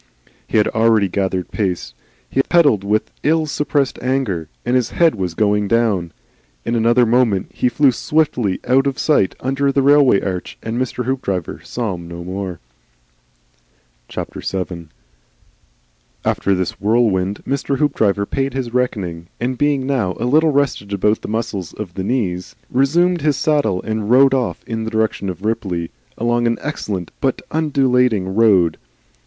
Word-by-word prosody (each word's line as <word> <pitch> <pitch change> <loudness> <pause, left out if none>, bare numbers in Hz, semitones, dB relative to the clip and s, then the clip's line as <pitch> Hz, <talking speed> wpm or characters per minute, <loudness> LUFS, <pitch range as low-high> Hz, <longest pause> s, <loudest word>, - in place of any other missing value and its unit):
He - - 0
had 105 - +4
already 110 -2 +3
gathered 95 -1 -2
pace. 90 - -2 0.3
He 135 - +1
pedalled 145 - +3
with 105 +2 0
ill 160 +1 +2
suppressed 145 -2 -1
anger, 120 - -1 0.2
and 120 +1 +1
his 125 -2 +1
head 170 -2 +3
was 90 -5 -3
going 105 0 +2
down. 100 -6 +1 0.5
In - - -1
another 120 +1 +4
moment 115 -5 +2
he 125 - +1
flew 140 +1 +4
swiftly 125 -7 0
out 135 +2 +3
of 135 - -2
sight 145 - +2
under 135 +2 +1
the 135 0 +1
railway 140 -6 +5
arch, 90 -3 -4
and 115 +2 -3
Mr. 125 -1 -3
Hoopdriver 100 -10 -2
saw 115 -5 -3
him 85 -1 -8
no 85 0 -7
more. 95 -1 -5 1.5
VII. 90 -3 -5 1.4
After 100 - +1
this 90 -1 -3
whirlwind 105 -3 +1
Mr. 140 0 -1
Hoopdriver 110 -9 +1
paid 135 +3 -2
his 125 -3 -3
reckoning 95 -10 -2
and 125 +2 -1
being 140 0 +1
now 120 -10 0
a 115 - -1
little 155 +5 +4
rested 135 -8 0
about 105 +2 +1
the - - -6
muscles 105 -5 -3
of 100 -5 -7
the 95 - -4
knees 95 -6 -2 0.2
resumed 170 +7 +2
his 145 -2 +1
saddle 145 -14 +1
and 110 -1 -3
rode 135 +2 +6
on 130 -3 0
in 115 -1 -3
the 110 - -3
direction 110 -3 -1
of 90 +2 -6
Ripley, 95 -7 -2 0.3
along 120 0 +1
an 115 - +1
excellent 100 - -4
but 135 -2 0
undulating 125 -10 +1
road. 95 -7 +3
115 Hz, 155 wpm, -19 LUFS, 95-135 Hz, 1.5 s, rode